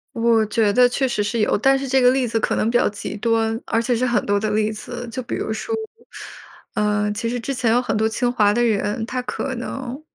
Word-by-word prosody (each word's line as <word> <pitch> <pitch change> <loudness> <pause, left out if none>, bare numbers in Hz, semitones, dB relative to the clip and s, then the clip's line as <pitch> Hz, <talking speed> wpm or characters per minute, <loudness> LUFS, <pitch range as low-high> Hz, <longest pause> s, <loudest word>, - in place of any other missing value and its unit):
我 230 -1 +3
觉 215 -1 +1
得 250 +1 +5
确 265 +2 0
实 225 -4 -1
是 230 +3 -2
有， 210 - +2
但 270 +6 +3
是 275 - -4
这 265 0 +3
个 250 0 +6
例 260 -1 +1
子 225 - -1
可 - - 0
能 220 - +1
比 240 - +3
较 - - +2
极 205 0 -6
端， 225 0 +1
而 225 - 0
且 240 +1 0
是 245 +2 0
很 240 -4 +1
多 205 0 +1
的 215 0 -1
例 215 0 +1
子。 240 +3 -7
就 255 +2 -5
比 235 - -4
如 220 - -3
说， 220 - -4 1.0
呃， 210 0 +1
其 230 +2 -3
实 245 +1 -2
之 255 +4 -3
前 240 -3 +1
有 245 +2 +3
很 250 - -2
多 220 +1 +1
清 240 +2 0
华 210 -4 +3
的 240 - +1
人， 215 -1 0
他 255 +2 -3
可 260 +1 -4
能 255 +3 -6
230 Hz, 270 characters per minute, -21 LUFS, 215-250 Hz, 1.0 s, 个